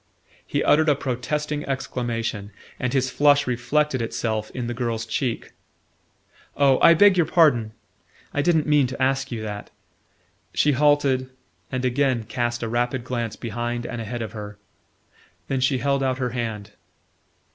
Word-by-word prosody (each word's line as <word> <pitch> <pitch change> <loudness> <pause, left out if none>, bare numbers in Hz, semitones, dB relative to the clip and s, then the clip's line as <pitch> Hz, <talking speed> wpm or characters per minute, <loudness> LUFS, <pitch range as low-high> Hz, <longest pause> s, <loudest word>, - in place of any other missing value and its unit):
He - - 0
uttered 155 +1 +4
a 145 - +4
protesting 145 +3 -3
exclamation, 115 -6 -3 0.3
and 125 - -1
his 130 -1 0
flush 145 0 +4
reflected 130 +3 0
itself 110 -1 -2
in 125 -2 -5
the 120 - -3
girl's 115 -2 -2
cheek. 120 +1 -3 1.1
"Oh, 140 -2 +4
I 170 - +8
beg 200 +2 +6
your 170 -4 +3
pardon! 135 -11 +3 0.6
I 145 - +1
didn't 160 -1 +2
mean 150 -3 +3
to 130 - -7
ask 135 0 0
you 115 -2 -4
that." 105 -1 -6 0.9
She 150 - +3
halted, 140 -2 +2 0.4
and 130 0 -2
again 130 -2 +1
cast 120 +2 -2
a - - -1
rapid 120 +2 -1
glance 120 -3 -3
behind 120 +1 -4
and 120 -1 -5
ahead 115 +1 -4
of 110 - -6
her. 105 -2 -8 0.9
Then 135 - -1
she 130 +1 +2
held 140 +1 0
out 130 -1 0
her 125 -2 -2
hand. 110 -4 -4
125 Hz, 155 wpm, -23 LUFS, 115-140 Hz, 1.1 s, I